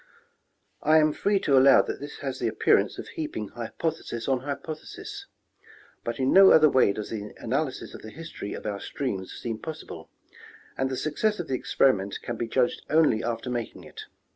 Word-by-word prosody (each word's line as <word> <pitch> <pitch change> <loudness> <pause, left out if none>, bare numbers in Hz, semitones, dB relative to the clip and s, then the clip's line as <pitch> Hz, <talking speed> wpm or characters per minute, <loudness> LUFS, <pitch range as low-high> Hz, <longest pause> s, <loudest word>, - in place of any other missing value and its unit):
I 155 +1 +5
am 155 -1 +4
free 200 +4 +1
to 140 - +3
allow 135 +1 +7
that - - -5
this 145 +1 -8
has 135 -2 -4
the 120 - 0
appearance 110 - +2
of - - -7
heaping 110 -10 -5
hypothesis 120 0 -4
on 135 -2 +2
hypothesis; 145 +3 -7 0.8
but 115 0 -3
in 130 0 +1
no 195 0 +9
other 155 -2 +7
way 130 -6 +4
does 105 +1 -6
the 105 -2 -6
analysis - - -2
of - - -9
the 110 - -9
history 160 -6 -7
of - - -9
our 100 -2 -3
streams 100 -9 -4
seem 115 -2 -5
possible, 160 +3 -8 0.7
and 135 0 -1
the 130 - -3
success 205 +10 0
of 175 - -5
the - - -1
experiment 105 -5 +1
can 120 - -4
be 115 +1 -3
judged 125 +2 +1
only 155 -8 +3
after 120 +2 -3
making 120 -2 -4
it. - - -10
130 Hz, 185 wpm, -26 LUFS, 115-155 Hz, 0.8 s, no